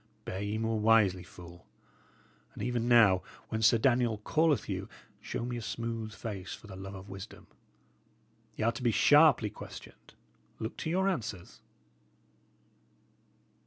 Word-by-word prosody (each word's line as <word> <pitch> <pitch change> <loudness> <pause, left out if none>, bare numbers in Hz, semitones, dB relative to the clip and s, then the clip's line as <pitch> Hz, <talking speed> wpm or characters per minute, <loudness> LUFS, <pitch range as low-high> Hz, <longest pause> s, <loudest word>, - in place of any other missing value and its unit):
Bear 95 - -4
ye 105 +1 -2
more 110 0 -1
wisely, 105 -4 +4
fool; 85 -1 -13 0.9
and - - -6
even 120 0 -1
now, 105 -6 +6 0.3
when 110 - -2
Sir 110 +1 +5
Daniel 120 -2 +2
calleth 155 -2 +2
you, - - -4 0.3
show 115 - -4
me 120 0 -4
a - - -5
smooth 115 -1 -4
face 100 -3 -6
for - - -16
the 100 -2 -10
love 95 +1 -8
of 95 +1 -10
wisdom. 95 +2 -10 1.1
Y' - - -2
are 115 - +3
to 125 - -8
be 120 - +2
sharply 135 0 +5
questioned. - - -12 0.4
Look 110 - -5
to 160 - -4
your 190 +3 +1
answers." 110 - -4
110 Hz, 145 wpm, -31 LUFS, 100-120 Hz, 1.1 s, now